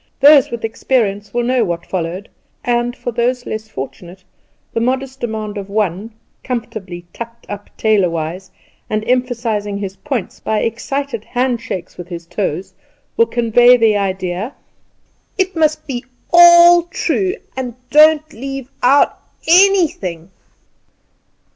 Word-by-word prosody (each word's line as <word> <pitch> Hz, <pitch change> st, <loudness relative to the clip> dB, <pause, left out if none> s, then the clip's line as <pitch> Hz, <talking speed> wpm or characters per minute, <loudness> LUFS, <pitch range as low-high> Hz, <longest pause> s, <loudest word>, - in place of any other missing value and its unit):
Those 285 Hz, 0 st, +7 dB
with 235 Hz, -1 st, -4 dB
experience 210 Hz, -3 st, -1 dB
will 240 Hz, +2 st, -1 dB
know 250 Hz, 0 st, +2 dB
what 170 Hz, -4 st, -3 dB
followed; 180 Hz, +2 st, -4 dB, 0.4 s
and, 240 Hz, 0 st, 0 dB
for 245 Hz, -, -5 dB
those 245 Hz, +1 st, -1 dB
less 220 Hz, 0 st, -5 dB
fortunate, 175 Hz, +3 st, -8 dB, 0.5 s
the -, -, 0 dB
modest 260 Hz, +2 st, -2 dB
demand 215 Hz, -3 st, -4 dB
of 195 Hz, 0 st, -8 dB
one, 205 Hz, +1 st, -2 dB, 0.3 s
comfortably 210 Hz, -8 st, -5 dB
tucked 235 Hz, 0 st, -9 dB
up 205 Hz, 0 st, -8 dB
tailorwise, 180 Hz, -4 st, 0 dB, 0.4 s
and 215 Hz, 0 st, -1 dB
emphasising 235 Hz, -5 st, -1 dB
his 195 Hz, -1 st, -6 dB
points 265 Hz, -9 st, -4 dB
by 215 Hz, -1 st, -1 dB
excited 235 Hz, +1 st, -3 dB
hand 245 Hz, -1 st, -1 dB
shakes 185 Hz, -6 st, -6 dB
with 175 Hz, -, -7 dB
his 170 Hz, -2 st, -7 dB
toes, 185 Hz, 0 st, -3 dB, 0.4 s
will 460 Hz, -, +3 dB
convey 240 Hz, +1 st, +5 dB
the 225 Hz, -3 st, +3 dB
idea: 190 Hz, +3 st, -2 dB, 0.8 s
"It 380 Hz, -1 st, 0 dB
must 310 Hz, -1 st, +1 dB
be 250 Hz, -3 st, -5 dB, 0.3 s
all 345 Hz, 0 st, +8 dB
true! 230 Hz, -, -1 dB, 0.2 s
and 250 Hz, -3 st, -4 dB, 0.2 s
don't 310 Hz, +1 st, +5 dB
leave 270 Hz, +2 st, -6 dB
out 275 Hz, +3 st, +3 dB, 0.3 s
anything!" 325 Hz, -, +3 dB
230 Hz, 130 wpm, -17 LUFS, 200-260 Hz, 0.8 s, all